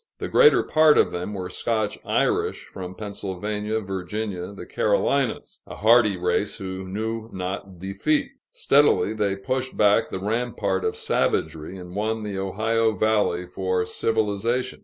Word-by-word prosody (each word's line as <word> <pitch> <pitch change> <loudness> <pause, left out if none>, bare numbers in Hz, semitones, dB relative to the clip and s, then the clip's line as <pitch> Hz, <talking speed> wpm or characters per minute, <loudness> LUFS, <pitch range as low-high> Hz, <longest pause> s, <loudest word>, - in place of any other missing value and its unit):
The - - -4
greater 455 -2 +5
part 155 -1 +5
of - - +4
them 90 +4 -4
were 90 -2 -5
Scotch 110 -3 -1
Irish - - 0
from 95 0 -8
Pennsylvania, 105 +1 -3
Virginia, 95 0 -4
the 100 - -9
Carolinas 120 +4 0
a - - -8
hardy 110 -2 +4
race, 90 +3 0
who 95 -2 -6
knew 110 +3 -4
not 95 0 -5
defeat. 100 - -1 0.2
Steadily 140 -6 +3
they 105 -3 0
pushed 130 +6 -3
back 105 +2 +4
the - - -4
rampart 105 -2 -1
of - - -1
savagery, 80 +3 -1
and 90 0 -10
won 110 +1 -1
the 100 -2 -4
Ohio 110 +3 +1
valley 105 -4 +1
for 90 0 -1
civilization. 110 +5 -1
105 Hz, 140 wpm, -24 LUFS, 95-110 Hz, 0.2 s, greater